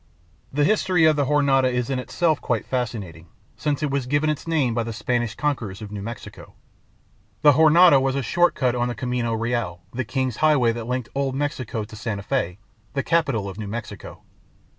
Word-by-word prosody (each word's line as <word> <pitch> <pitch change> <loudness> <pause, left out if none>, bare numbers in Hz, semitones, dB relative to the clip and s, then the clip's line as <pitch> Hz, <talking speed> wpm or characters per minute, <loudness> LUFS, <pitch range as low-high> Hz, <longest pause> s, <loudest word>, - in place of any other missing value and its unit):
The 145 +2 +1
history 185 -2 +3
of 155 -1 +5
the 145 -1 +1
Jornada 135 -2 +3
is 125 +1 -1
in 130 - 0
itself 155 +4 0
quite 115 -4 -1
fascinating, 105 -10 -4 0.3
since 150 -1 -2
it 145 - 0
was 135 -2 -1
given 145 +3 +2
its 150 - -6
name 150 -8 +1
by 120 - 0
the 115 0 -4
Spanish 120 0 -1
conquerors 120 -10 -2
of 105 -2 -8
New 105 -1 -5
Mexico. 115 +2 -9 0.9
The 150 - +8
Jornada 155 0 +6
was 135 0 0
a 140 - -1
short 175 +8 +2
cut 125 -3 +1
on 120 0 0
the 120 - -3
Camino 120 0 -2
Real, 115 -6 -2
the 130 +2 -2
King's 130 0 -2
Highway 145 -7 +4
that 115 0 -6
linked 125 -1 -3
old 135 -1 -1
Mexico 130 -6 -3
to 105 - -11
Santa 105 -2 -4
Fe, 100 -7 -1 0.4
the 140 - -1
capital 140 -11 +1
of 95 +2 -7
New 105 - -5
Mexico. 110 +2 -7
125 Hz, 195 wpm, -23 LUFS, 115-145 Hz, 0.9 s, The